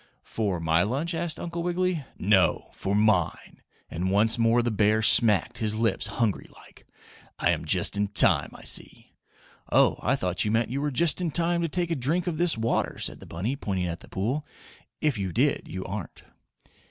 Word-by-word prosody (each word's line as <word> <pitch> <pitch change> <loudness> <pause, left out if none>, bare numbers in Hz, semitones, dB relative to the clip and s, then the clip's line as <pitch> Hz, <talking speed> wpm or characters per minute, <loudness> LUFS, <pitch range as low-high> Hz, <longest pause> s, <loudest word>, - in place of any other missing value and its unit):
"For 100 -6 -2
my 80 +1 +2
lunch?" 140 - -1
asked 165 -1 -3
Uncle 170 0 -5
Wiggily. 175 -2 -1
"No. 95 -3 +2
For 100 +1 -3
MINE!" 105 -5 0 0.3
and 90 +3 -3
once 105 +4 +3
more 115 +1 +3
the 120 - -1
bear 110 +1 +2
smacked 110 -1 +4
his 110 -2 -1
lips 110 -2 0
hungry 115 -4 -2
like. - - -19 0.5
"I - - +2
am - - -2
just - - +2
in 100 0 0
time, 105 - +4
I - - -12
see." - - -2 0.6
"Oh, - - +3
I 130 - +1
thought 90 -6 -1
you 105 - -1
meant 115 +1 0
you 140 +2 -2
were 150 - 0
just 165 +5 +2
in 175 - -1
time 170 +2 +1
to 170 - 0
take 175 +1 -1
a - - +1
drink 155 +7 -1
of 170 -4 -3
this 175 -7 +1
water," 115 +1 -1
said - - -4
the - - -13
bunny, 100 +11 -3
pointing 95 -9 -3
at 85 0 -4
the - - -15
pool. 125 +10 -2 0.6
"If 150 -8 0
you 95 -2 -3
did, - - 0
you 95 +1 -6
aren't." 100 0 -7
115 Hz, 195 wpm, -26 LUFS, 100-155 Hz, 0.6 s, smacked